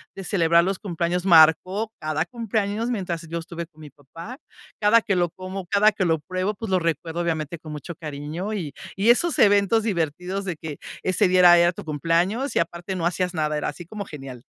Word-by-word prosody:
de 195 - -7
celebrar 170 -3 +3
los 190 +1 -2
cumpleaños. 175 -1 -2
Marcó 185 +5 +5
cada 155 +1 -1
cumpleaños 220 0 -2
mientras 180 -7 -3
yo 165 +1 -4
estuve 170 0 -7
con 155 -2 -19
mi 150 - -10
papá. 165 - -11 0.4
Cada 215 +2 +5
que 205 -3 -1
lo 175 -1 +1
como, 185 +2 -7
cada 205 +4 +4
que 200 -2 -2
lo 165 -2 +2
pruebo, 185 +6 -2
pues, 225 +1 -6
lo 185 - +3
recuerdo, 165 0 -2
obviamente, 165 -1 -2
con 155 -1 -10
mucho 155 +3 -7
cariño. 155 +5 -5
Y 165 -9 -4 0.2
y 200 +4 +1
esos 335 +7 +1
eventos 205 +2 +4
divertidos 180 0 -2
de 180 -3 -3
que 155 -2 -7 0.3
ese 185 +2 +2
día 185 0 +3
era 175 -1 +8
era 170 0 +4
tu 205 - -9
cumpleaños 170 - 0
y - - +3
aparte 170 +3 -3
no 170 -2 -2
hacías 180 +1 0
nada, 155 -2 -1
era 150 - -2
así 170 +4 -9
como 205 +3 -7
genial. 135 -7 -9
175 Hz, 205 wpm, -23 LUFS, 160-200 Hz, 0.4 s, era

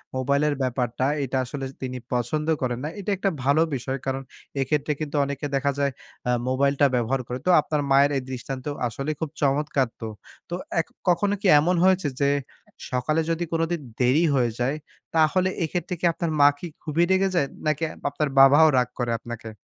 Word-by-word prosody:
মোবাইলের 140 +3 +1
ব্যাপারটা, 125 -1 -1 0.2
এটা 130 0 -2
আসলে 135 +1 -5
স - - -20
তিনি 130 -1 -4 0.2
পছন্দ 125 +6 -1
করেন 125 -2 -1
না। 150 - -2
এটা 200 +1 -2
একটা 195 - +1
ভালো 140 +4 +3
বিষয়। 130 +1 -3
কারণ 135 0 -2 0.4
এক্ষেত্রে 145 +2 0
কিন্তু 155 -1 -4
অনেকে 140 +1 -4
দেখা 140 +1 +1
যায় 140 -1 +1 0.4
আ - - +4 0.2
মোবাইলটা 140 +2 +2
ব্যবহার 125 +2 0
করে। 125 +1 -4
তো - - +1
আপনার 150 0 -1
মায়ের 140 +1 +5
এই - - -1
দৃষ্টান্ত 130 0 -6 0.2
আসলেই 140 +6 -4
খুব 160 - -1
চমৎকার 140 -2 +1
তো। 110 - -3 0.4
তো 175 - -2 0.2
এ - - +5 0.3
কখনো 195 +4 +2
কি 205 - +1
এমন 175 +5 +2
হয়েছে? 185 -3 +3
যে 140 -1 +3 0.6
সকালে 140 +6 +1
যদি 165 +1 -1
কোনদিন 165 0 0 0.2
দেরি 130 +6 +3
হয়ে 120 -3 +2
যায়, 130 +4 0 0.4
তাহলে 170 +4 +3
এক্ষেত্রে 175 +2 -2
কি 180 - -1
আপনার 165 0 -2
মা 145 - +9
কি 175 - -5 0.2
খুবই 160 +2 +1
রেগে 190 +1 +3
যায়? 145 -6 +2 0.2
নাকি 155 +1 0 0.3
আপনার 150 -2 -1
বাবাও 145 +4 +8
রাগ 125 -1 +3
করে 120 -1 0
আপনাকে 115 -1 -8
140 Hz, 185 wpm, -24 LUFS, 130-160 Hz, 0.6 s, মা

